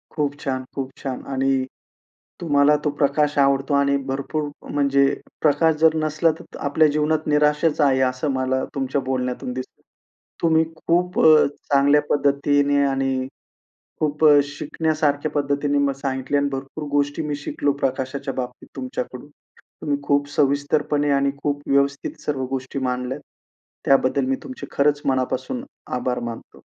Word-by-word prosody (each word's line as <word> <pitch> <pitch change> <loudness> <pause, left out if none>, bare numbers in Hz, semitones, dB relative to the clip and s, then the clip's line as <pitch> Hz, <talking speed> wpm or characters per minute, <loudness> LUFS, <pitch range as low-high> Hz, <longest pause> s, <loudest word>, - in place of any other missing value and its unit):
खूप 145 -2 -1
छान. 130 -3 -3
खूप 135 -1 -4
छान. 135 -2 -5
आणि 135 -1 0 0.8
तुम्हाला 145 -2 +4
तो - - +3
प्रकाश 145 +1 +2
आवडतो 140 0 +2
आणि 140 0 +3
भरपूर 145 +3 -2 0.2
म्हणजे 140 -1 +3 0.4
प्रकाश 155 +1 +3
जर 160 0 +5
नसला, 155 +2 +2
तर - - -12
आपल्या 155 +2 +4
जीवनात 155 +1 +1
निराशाच 150 +1 +2
आहे 135 -2 +3
असं 130 +3 -3
मला 130 0 0
तुमच्या 135 0 -1
बोलण्यातून 125 -1 -2
दिसतं. 130 0 -8 0.6
तुम्ही 160 -1 +4
खूप 175 +2 0
अ, 155 -1 +7 0.3
चांगल्या 145 +1 +5
पद्धतीने 145 0 +2
आणि 135 -1 0 0.7
खूप 150 0 0
अ, 150 -1 +8
शिकण्यासारख्या 150 0 -1
पद्धतीने 145 0 0
म 140 0 +2
सांगितले 135 0 -1
आणि 140 0 +1
भरपूर 135 +3 -5
गोष्टी 145 +2 0
मी 145 - -1
शिकलो 145 -1 -1
प्रकाशाच्या 135 +1 -2
बाबतीत 125 -1 -6
तुमच्याकडून. 130 +1 -5 0.5
तुम्ही 145 -1 0
खूप 145 0 +1
सविस्तरपणे 145 +1 +1
आणि 140 0 +2
खूप 145 0 -1
व्यवस्थित 140 0 0
सर्व 135 -3 -1
गोष्टी 135 +1 -4
मांडल्यात, 125 +1 -2 0.6
त्याबद्दल 135 0 +3
मी 135 0 0
तुमचे 260 0 -8
खरंच 145 +1 +2
मनापासून 135 - -1 0.3
आभार 125 0 -2
मानतो. 115 - -11
140 Hz, 135 wpm, -22 LUFS, 135-150 Hz, 0.8 s, अ